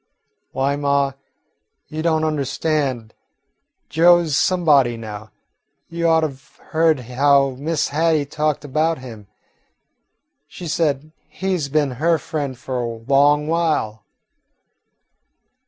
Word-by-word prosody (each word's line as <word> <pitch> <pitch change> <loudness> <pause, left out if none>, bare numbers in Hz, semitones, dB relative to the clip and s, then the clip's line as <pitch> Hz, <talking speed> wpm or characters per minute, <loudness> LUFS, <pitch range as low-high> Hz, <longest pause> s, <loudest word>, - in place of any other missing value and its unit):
"Why, 135 +1 0
ma, 140 -1 +1 0.8
you 155 0 -5
don't 160 -1 +1
understand. 140 -5 -1 0.7
Joe 175 +2 +5
's 150 -4 -1
somebody 145 -10 +3
now. 110 -1 -8 0.6
You 170 0 -1
ought 160 -1 +4
to 155 - 0
've 135 -1 -18
heard 160 -3 +2
how 135 +3 +2
Miss 150 0 -1
Hattie 155 0 +1
talked 150 +1 -2
about 155 +3 0
him. 115 -6 -11 1.2
She 175 - -9
said 155 -2 -1 0.2
he 190 0 -2
's 150 -6 -3
been 145 -1 +1
her 165 0 +3
friend 145 -5 -4
for 130 0 -4
a 120 - -2
long 140 +6 +2
while." 155 -10 -1
145 Hz, 120 wpm, -20 LUFS, 135-160 Hz, 1.2 s, Joe